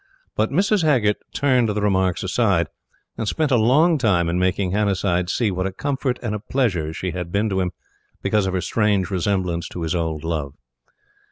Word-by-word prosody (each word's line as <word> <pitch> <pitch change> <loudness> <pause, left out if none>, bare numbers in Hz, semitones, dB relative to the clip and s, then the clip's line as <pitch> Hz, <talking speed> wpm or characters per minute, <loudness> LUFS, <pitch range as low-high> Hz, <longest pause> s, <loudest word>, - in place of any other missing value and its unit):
But 110 +1 +1
Mrs. 195 +6 +2
Haggert 125 -10 +2
turned 130 -5 +2
the 105 0 -1
remarks 95 -3 +1
aside, - - +1 0.5
and 110 - -2
spent 155 +5 0
a - - +5
long 145 +8 +4
time 90 -8 +2
in 85 +1 0
making 95 0 0
Hannasyde 95 -3 0
see 110 +1 +1
what 95 +1 -1
a - - -4
comfort 135 +3 -2
and 110 -3 -2
a 105 - -2
pleasure 100 - -1
she 90 +3 -4
had 90 -1 -5
been 105 +3 +1
to 95 -1 0
him 90 -1 0 0.5
because 105 -2 +1
of 95 - -2
her 90 - 0
strange 100 +1 +1
resemblance 90 -2 -1
to 85 - -6
his 80 - -1
old 80 -3 -2
love. 75 -4 -3
100 Hz, 190 wpm, -22 LUFS, 90-115 Hz, 0.5 s, a